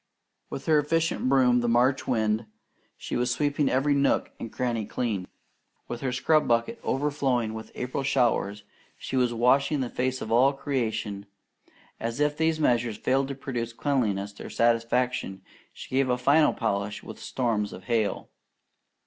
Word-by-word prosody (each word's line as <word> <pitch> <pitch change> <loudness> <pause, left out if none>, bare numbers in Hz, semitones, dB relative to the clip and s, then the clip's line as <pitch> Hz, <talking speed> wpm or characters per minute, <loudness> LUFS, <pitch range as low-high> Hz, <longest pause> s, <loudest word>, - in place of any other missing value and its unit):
With 135 - -6
her 155 -2 +4
efficient 160 -2 0
broom, 125 -2 +4
the 120 - 0
March 125 +3 +2
wind, 110 -2 0 0.5
she - - -5
was 125 +1 +1
sweeping 145 +2 +1
every 135 +3 +2
nook 140 0 +1
and 115 - -6
cranny 120 -3 -1
clean. 105 -3 -3 0.6
With 120 - -6
her 130 -2 -1
scrub 155 +4 +2
bucket 120 - +1
overflowing 135 -5 0
with 110 0 -8
April 125 +2 -3
showers, 120 -6 +1 0.3
she - - -5
was 125 -2 +2
washing 130 +5 +2
the 125 - -3
face 130 +1 -1
of 110 - -6
all 130 +4 +5
creation, 110 -7 -3 0.7
and 115 +3 -3
if 150 0 +2
these 160 0 +1
measures 120 -6 +1
failed 135 +1 +1
to 140 - -5
produce 120 -3 -4
cleanliness 105 -8 -1
to - - -11
her - - -7
satisfaction, 115 -4 0 0.3
she - - -11
gave 135 -1 +2
a 125 - +2
final 145 +5 +4
polish 100 +1 -2
with - - -9
storms 110 -5 -1
of 95 - -10
hail. 110 0 -1
125 Hz, 160 wpm, -27 LUFS, 115-135 Hz, 0.7 s, all